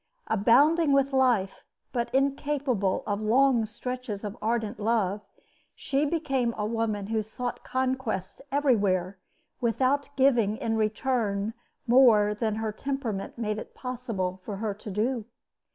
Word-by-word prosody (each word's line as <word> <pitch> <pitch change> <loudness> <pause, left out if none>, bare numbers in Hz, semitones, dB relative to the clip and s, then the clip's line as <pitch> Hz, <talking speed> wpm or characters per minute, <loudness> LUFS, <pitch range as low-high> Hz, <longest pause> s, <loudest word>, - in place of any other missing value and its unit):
Abounding 285 - +4
with 275 0 +2
life, 245 -8 +2 0.3
but 235 -1 -1
incapable 270 -6 0
of 205 0 -2
long 240 +1 +3
stretches 245 -2 -5
of 205 0 -5
ardent 225 0 -1
love, 210 -2 0 0.5
she 280 +2 0
became 270 -7 0
a 210 - -1
woman 215 -2 -1
who 220 +1 0
sought 240 +3 -5
conquests 255 -7 -2
everywhere 200 -10 +1 0.4
without 260 +4 +1
giving 235 -6 +3
in 225 0 -1
return 215 -1 0 0.3
more 230 -5 +5
than 215 0 -1
her 220 0 -2
temperament 245 -5 -4
made 215 -2 -2
it - - -10
possible 225 -8 -4
for 205 - -5
her 210 0 -2
to 210 +2 -10
do. 220 +3 -1
230 Hz, 130 wpm, -27 LUFS, 210-260 Hz, 0.5 s, more